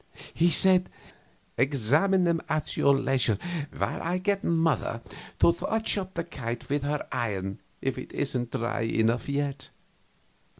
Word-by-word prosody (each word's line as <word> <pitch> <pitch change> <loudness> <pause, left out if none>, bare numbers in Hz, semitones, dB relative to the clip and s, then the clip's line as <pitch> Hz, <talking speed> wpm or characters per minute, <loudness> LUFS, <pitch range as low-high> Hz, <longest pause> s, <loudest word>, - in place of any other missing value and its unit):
He 170 +1 +3
said: 185 +2 +4 0.7
"Examine 145 - +3
them 170 -1 +2
at 155 0 -1
your 140 -1 +4
leisure 130 -6 +2 0.3
while 100 - -2
I 175 +2 -1
get 200 +1 0
mother 160 -8 +1 0.3
to 170 - +5
touch 220 +6 0
up 190 -2 -4
the 170 - -1
kite 120 -6 -6
with 145 +1 +1
her 145 +1 -2
iron 100 -4 -2 0.2
if - - -1
it - - -8
isn't 120 -2 -2
dry 115 0 -2
enough 115 +3 +1
yet." 140 -1 -2
140 Hz, 140 wpm, -27 LUFS, 120-170 Hz, 0.7 s, to